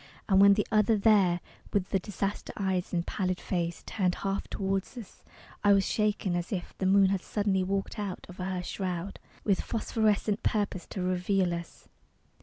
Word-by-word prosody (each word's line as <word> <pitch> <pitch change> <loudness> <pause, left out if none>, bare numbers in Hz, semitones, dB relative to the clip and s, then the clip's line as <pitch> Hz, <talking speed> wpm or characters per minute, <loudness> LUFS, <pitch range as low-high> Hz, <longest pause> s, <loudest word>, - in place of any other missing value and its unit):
And 195 -2 +5
when 200 0 +8
the 210 - +1
other, 215 0 +4
there, 195 -5 +4 0.3
With 195 -2 0
the 195 - +1
disaster 200 +1 -3
eyes 190 -2 -1
and 170 -1 -1
pallid 185 -2 -1
face, 170 -2 -2
Turned 185 -4 0
half 195 0 -2
toward 195 0 -1 0.2
us, 225 -6 -10 0.4
I 205 0 +6
was 195 -1 +3
shaken 210 -4 0
as 175 +3 -3
if 185 -4 -4
The 190 - +1
moon 195 0 +5
had 195 -1 0
suddenly 200 -3 0
walked 195 +3 -2
out 200 -3 -4
of 180 - -12
her 185 -1 -3
shroud 185 0 -4 0.2
With 200 -3 +2
phosphorescent 215 -2 0
purpose 205 -4 -1
to 185 - -4
reveal 180 0 +1
us. 170 -1 -7
195 Hz, 175 wpm, -29 LUFS, 180-205 Hz, 0.4 s, when